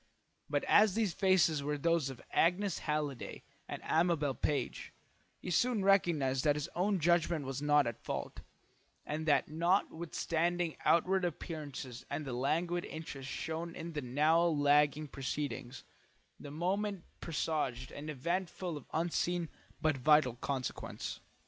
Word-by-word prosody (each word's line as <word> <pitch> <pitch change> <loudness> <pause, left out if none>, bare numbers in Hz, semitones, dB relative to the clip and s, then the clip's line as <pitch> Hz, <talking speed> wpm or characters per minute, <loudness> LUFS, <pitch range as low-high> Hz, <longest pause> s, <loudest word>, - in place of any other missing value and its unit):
But - - 0
as 210 -2 +5
these 215 -6 +1
faces 185 -6 +3
were 150 +1 -1
those 165 -1 +1
of 130 -3 -9
Agnes 180 +2 +2
Halliday 150 -4 -3 0.2
and - - -6
Amabel 160 -4 +2
Page, 135 -2 -2 0.5
he 180 - -5
soon 220 +2 +2
recognised 155 -10 +3
that 145 -1 +4
his 150 +1 -3
own 190 +2 +1
judgment 170 -2 +2
was 135 +1 -4
not 145 -1 +4
at 120 -1 -4
fault, - - -4 0.7
and 155 +2 -3
that 145 - +4
notwithstanding 170 0 0
outward 185 +3 +3
appearances 145 -7 -5
and 155 - -3
the 130 - -4
languid 170 +7 0
interest 140 -4 -7
shown 165 +1 -4
in 165 +1 -6
the 150 - -2
now 150 +6 +3
lagging 150 -2 +3
proceedings, 135 -2 -4 0.6
the 145 - -8
moment 190 +5 -1 0.2
presaged 150 -6 -2
an 150 +2 -7
event 170 +6 -1
full 175 -4 -5
of - - -11
unseen 170 0 0 0.3
but 155 -3 +1
vital 150 -1 +4
consequence. 130 +1 -4
155 Hz, 135 wpm, -33 LUFS, 145-175 Hz, 0.7 s, as